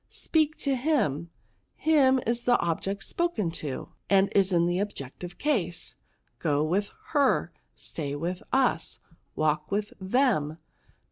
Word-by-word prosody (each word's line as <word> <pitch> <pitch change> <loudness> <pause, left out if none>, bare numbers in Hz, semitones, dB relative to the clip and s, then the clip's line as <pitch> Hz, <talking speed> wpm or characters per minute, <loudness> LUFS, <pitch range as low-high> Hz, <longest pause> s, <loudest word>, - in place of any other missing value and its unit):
Speak 310 -1 +1
to 275 -2 0
him; 240 - 0 0.5
him 275 -5 +4
is 235 +1 -1
the 245 -1 +5
object 195 +4 -2
spoken 340 - -1
to, 150 -5 -5 0.2
and 195 0 +4
is 195 -1 +3
in 170 -1 +3
the 175 +1 +1
object 160 -9 -6
ive 175 0 -7
case. 220 - -1 0.5
Go 145 0 +1
with 190 +6 0 0.2
her; 285 -4 +2 0.2
stay 145 -3 -4
with 175 +5 -3
its; 255 -11 +1 0.3
walk 155 +1 +1
with 205 +1 -1
them. 190 - +2
195 Hz, 135 wpm, -28 LUFS, 165-260 Hz, 0.5 s, the